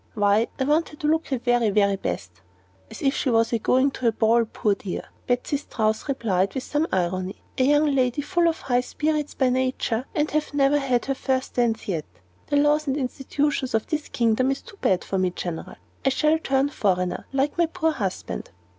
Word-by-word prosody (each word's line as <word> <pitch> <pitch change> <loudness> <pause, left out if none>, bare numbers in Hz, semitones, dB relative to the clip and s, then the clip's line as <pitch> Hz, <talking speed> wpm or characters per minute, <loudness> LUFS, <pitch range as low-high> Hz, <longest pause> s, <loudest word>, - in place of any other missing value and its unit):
Why, 205 +1 +3
I - - 0
want 300 +4 +2
her - - -12
to 300 - -3
look 320 +1 +2
at - - -14
her 265 - 0
very, 240 -2 +2
very 200 -1 +3
best." 90 - -5 0.5
"As - - -9
if 275 0 +2
she 270 - 0
was 230 0 +2
a 230 - +2
going 260 +5 +3
to 255 -2 -2
a - - +5
ball, 225 +1 +3
poor 215 -1 0
dear!" 195 -2 -5 0.2
Betsy 250 +3 0
Strouss 220 -5 -1
replied, 200 -8 0
with 260 - -2
some 295 +3 0
irony. 185 +1 -2 0.2
"A 255 - +4
young 295 +2 +4
lady 260 +1 +1
full 345 +3 +2
of 330 - -1
high 245 -1 +1
spirits 300 +3 -2
by 260 -2 +2
nature, 255 -1 -1
and 300 0 +1
have 300 -1 -1
never 280 +1 +4
had 255 -3 0
her 275 - 0
first 260 0 -2
dance 235 -2 0
yet! 165 -6 -2 0.4
The 290 - +1
laws 295 +1 +3
and 270 +1 0
institutions 270 0 -1
of 220 - +1
this 305 -1 -3
kingdom 235 +2 +2
is 270 - -2
too 400 - -14
bad 185 - +2
for 190 - -2
me, 185 -1 +2
General. 175 -2 -6 0.3
I 270 - +3
shall 305 +4 +2
turn 270 -2 +1
foreigner, 180 -8 -1
like 275 +4 0
my 340 - +4
poor 320 -1 0
husband." 195 -10 -4
255 Hz, 210 wpm, -24 LUFS, 220-290 Hz, 0.5 s, a